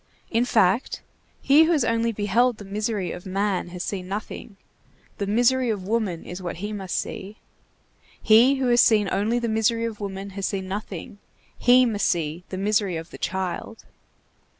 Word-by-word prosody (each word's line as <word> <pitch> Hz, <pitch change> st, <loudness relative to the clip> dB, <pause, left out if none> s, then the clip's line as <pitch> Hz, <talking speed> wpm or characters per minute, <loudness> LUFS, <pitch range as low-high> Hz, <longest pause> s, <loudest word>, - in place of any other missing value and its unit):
In 235 Hz, +1 st, +2 dB
fact, 220 Hz, -1 st, +1 dB, 0.4 s
he 295 Hz, +4 st, +6 dB
who 335 Hz, -, +1 dB
has 290 Hz, -7 st, +2 dB
only 230 Hz, 0 st, +1 dB
beheld 225 Hz, +3 st, +1 dB
the 205 Hz, -, -10 dB
misery 205 Hz, -1 st, -2 dB
of 180 Hz, -, -8 dB
man 195 Hz, -1 st, -1 dB
has 180 Hz, 0 st, -6 dB
seen 185 Hz, -3 st, -4 dB
nothing; 200 Hz, +1 st, -6 dB, 0.6 s
the 200 Hz, -, -2 dB
misery 245 Hz, +4 st, +2 dB
of 200 Hz, -4 st, -3 dB
woman 210 Hz, -6 st, -1 dB
is 180 Hz, +2 st, -7 dB
what 175 Hz, -2 st, -4 dB
he 205 Hz, +4 st, -5 dB
must 190 Hz, -3 st, -4 dB
see; 200 Hz, +3 st, -5 dB, 0.8 s
he 235 Hz, +5 st, +5 dB
who 265 Hz, -1 st, -1 dB
has 240 Hz, 0 st, +5 dB
seen 210 Hz, -3 st, +4 dB
only 220 Hz, +4 st, +1 dB
the 240 Hz, -1 st, -1 dB
misery 225 Hz, +1 st, +1 dB
of 225 Hz, -2 st, -5 dB
woman 195 Hz, -1 st, -6 dB
has 195 Hz, 0 st, -3 dB
seen 190 Hz, -1 st, -3 dB
nothing; 200 Hz, -1 st, -6 dB, 0.4 s
he 250 Hz, +1 st, +5 dB
must 215 Hz, -4 st, 0 dB
see 165 Hz, 0 st, -1 dB
the 185 Hz, -, -5 dB
misery 200 Hz, -2 st, 0 dB
of 165 Hz, +1 st, -8 dB
the -, -, -10 dB
child. 190 Hz, +4 st, -4 dB
205 Hz, 175 wpm, -24 LUFS, 190-230 Hz, 0.8 s, he